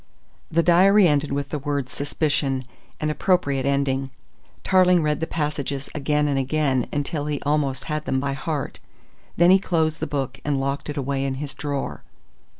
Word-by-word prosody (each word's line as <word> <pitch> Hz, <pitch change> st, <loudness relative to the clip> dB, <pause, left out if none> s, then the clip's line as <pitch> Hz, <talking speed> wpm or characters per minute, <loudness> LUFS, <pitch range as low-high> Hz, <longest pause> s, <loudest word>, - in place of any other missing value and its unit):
The 170 Hz, +1 st, +2 dB
diary 185 Hz, +4 st, +6 dB
ended 145 Hz, -2 st, +1 dB
with 140 Hz, 0 st, -2 dB
the 150 Hz, -, -3 dB
word 140 Hz, -2 st, -2 dB
"suspicion," 140 Hz, -1 st, -1 dB, 0.3 s
an 155 Hz, 0 st, 0 dB
appropriate 145 Hz, -6 st, +1 dB
ending. 135 Hz, -1 st, 0 dB, 0.5 s
Tarling 180 Hz, -2 st, +4 dB
read 150 Hz, -1 st, 0 dB
the 160 Hz, -, -2 dB
passages 145 Hz, -3 st, -3 dB
again 150 Hz, 0 st, +1 dB
and 140 Hz, -2 st, +1 dB
again 135 Hz, -2 st, 0 dB
until 145 Hz, 0 st, -2 dB
he 150 Hz, -2 st, -1 dB
almost 145 Hz, -3 st, 0 dB
had 150 Hz, -1 st, -3 dB
them 130 Hz, -, 0 dB
by 140 Hz, 0 st, -1 dB
heart. 140 Hz, +1 st, -4 dB, 0.6 s
Then 175 Hz, +1 st, +6 dB
he 190 Hz, -, +7 dB
closed 160 Hz, -4 st, 0 dB
the -, -, -2 dB
book 135 Hz, -3 st, -3 dB
and 145 Hz, -2 st, 0 dB
locked 140 Hz, +2 st, -2 dB
it 145 Hz, -, -4 dB
away 135 Hz, 0 st, -1 dB
in 135 Hz, -1 st, -1 dB
his 140 Hz, 0 st, -5 dB
drawer. 140 Hz, 0 st, -4 dB
145 Hz, 170 wpm, -23 LUFS, 135-155 Hz, 0.6 s, he